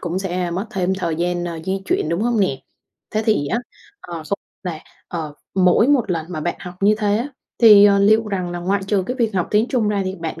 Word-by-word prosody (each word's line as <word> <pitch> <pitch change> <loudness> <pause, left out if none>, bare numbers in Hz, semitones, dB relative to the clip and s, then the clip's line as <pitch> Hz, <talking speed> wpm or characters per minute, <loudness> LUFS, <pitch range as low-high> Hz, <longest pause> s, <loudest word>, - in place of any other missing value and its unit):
cũng 175 +1 -2
sẽ 180 -2 -2
mất 190 +5 -3
thêm 190 0 -1
thời 170 -4 -2
gian, 175 +1 -1
ờ, 170 -2 -5
di 190 +1 -2
chuyển, 155 - 0
đúng 170 +5 -1
hông 235 -2 +1
nè? 135 -9 0 0.5
Thế 215 - -1
thì 210 -10 +2
á, 230 - 0 0.4
ờ, 175 - -9
không 200 - -1 0.2
là, 175 -4 -4 0.3
ờ, 155 -4 -5 0.2
mỗi 190 +5 +4
một 260 -8 +2
lần 165 -3 -2
mà 175 -4 -5
bạn 170 +3 -1
học 180 0 -8
như 205 +2 +4
thế 205 -1 +1
á 250 - -3 0.3
thì, 210 -3 +9
ờ, 200 -1 +5
liệu 215 +2 +4
rằng 185 -3 -2
là 175 - -4
ngoại 190 +3 -1
trừ 200 -2 +1
cái 250 - -3
việc 225 -5 0
học 180 -2 0
tiếng 215 +3 +2
Trung 235 -5 +1
ra 205 -1 0
thì 185 0 -3
bạn 165 -2 -6
190 Hz, 250 wpm, -20 LUFS, 175-210 Hz, 0.5 s, thì